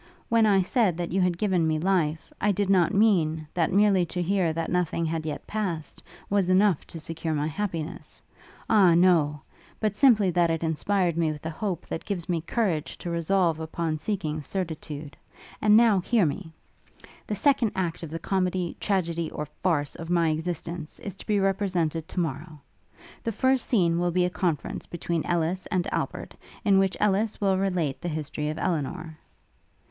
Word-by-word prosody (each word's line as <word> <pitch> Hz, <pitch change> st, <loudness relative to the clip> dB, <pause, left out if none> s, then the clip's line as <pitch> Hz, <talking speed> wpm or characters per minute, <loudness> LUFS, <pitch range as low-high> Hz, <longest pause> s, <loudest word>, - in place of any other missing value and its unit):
When 225 Hz, -1 st, +4 dB
I 195 Hz, -2 st, +4 dB
said 195 Hz, -4 st, +1 dB
that 175 Hz, -1 st, -3 dB
you 190 Hz, +2 st, +1 dB
had 180 Hz, -2 st, +1 dB
given 180 Hz, -5 st, +1 dB
me 155 Hz, -1 st, +1 dB
life, 165 Hz, -3 st, 0 dB
I 210 Hz, -, +3 dB
did 200 Hz, 0 st, 0 dB
not 180 Hz, -3 st, +4 dB
mean, 170 Hz, -7 st, +2 dB
that 170 Hz, 0 st, +1 dB
merely 195 Hz, -1 st, +4 dB
to 180 Hz, -, -3 dB
hear 185 Hz, -2 st, +1 dB
that 165 Hz, +1 st, -3 dB
nothing 175 Hz, -2 st, 0 dB
had 160 Hz, 0 st, -2 dB
yet 150 Hz, -, -5 dB
passed, 185 Hz, -8 st, -4 dB, 0.3 s
was 195 Hz, -2 st, +1 dB
enough 190 Hz, -2 st, +3 dB
to 165 Hz, -, -8 dB
secure 160 Hz, 0 st, -3 dB
my 145 Hz, 0 st, 0 dB
happiness: 165 Hz, -1 st, -4 dB, 0.5 s
Ah 190 Hz, -6 st, +5 dB
no! 165 Hz, -5 st, +3 dB, 0.4 s
but 215 Hz, -2 st, 0 dB
simply 215 Hz, -7 st, +5 dB
that 175 Hz, -1 st, +2 dB
it 165 Hz, 0 st, -1 dB
inspired 170 Hz, +2 st, 0 dB
me 165 Hz, -2 st, +2 dB
with 150 Hz, +1 st, -9 dB
a 160 Hz, -, -2 dB
hope 180 Hz, +1 st, -3 dB
that -, -, -5 dB
gives 185 Hz, -5 st, -4 dB
me 170 Hz, -2 st, 0 dB
courage 170 Hz, -4 st, -1 dB
to 175 Hz, -, -5 dB
resolve 170 Hz, -1 st, +1 dB
upon 160 Hz, 0 st, -3 dB
seeking 155 Hz, -5 st, -2 dB
certitude. 155 Hz, -4 st, -5 dB, 0.5 s
And 210 Hz, 0 st, +6 dB
now, 225 Hz, -4 st, +5 dB
hear 210 Hz, +2 st, +2 dB
me! 160 Hz, +3 st, -3 dB, 0.8 s
'The 210 Hz, -, -2 dB
second 245 Hz, -1 st, +2 dB
act 175 Hz, -3 st, -2 dB
of 165 Hz, -, -6 dB
the 165 Hz, -, -4 dB
comedy, 185 Hz, -1 st, -1 dB
tragedy, 170 Hz, -5 st, -1 dB
or 150 Hz, -, -5 dB, 0.2 s
farce, 150 Hz, -6 st, +1 dB
of 165 Hz, 0 st, -8 dB
my 170 Hz, -2 st, +3 dB
existence, 165 Hz, 0 st, -4 dB
is 200 Hz, -, -5 dB
to -, -, -10 dB
be 210 Hz, -2 st, +2 dB
represented 180 Hz, -5 st, 0 dB
to -, -, -4 dB
morrow. 155 Hz, -1 st, -4 dB, 0.6 s
The 230 Hz, -, -1 dB
first 260 Hz, +4 st, +1 dB
scene 170 Hz, -7 st, +2 dB
will 175 Hz, 0 st, +1 dB
be 180 Hz, +1 st, +2 dB
a 180 Hz, -, -1 dB
conference 170 Hz, -6 st, -2 dB
between 170 Hz, -1 st, -2 dB
Ellis 175 Hz, +2 st, -1 dB
and 180 Hz, -1 st, 0 dB
Albert, -, -, -3 dB, 0.3 s
in 195 Hz, -2 st, +5 dB
which 195 Hz, -1 st, +1 dB
Ellis 210 Hz, +1 st, +1 dB
will 195 Hz, -2 st, +2 dB
relate 180 Hz, -8 st, -1 dB
the 175 Hz, -, -3 dB
history 150 Hz, -1 st, -3 dB
of 155 Hz, -, -4 dB
Elinor.' 160 Hz, -1 st, -3 dB
175 Hz, 180 wpm, -26 LUFS, 160-195 Hz, 0.8 s, And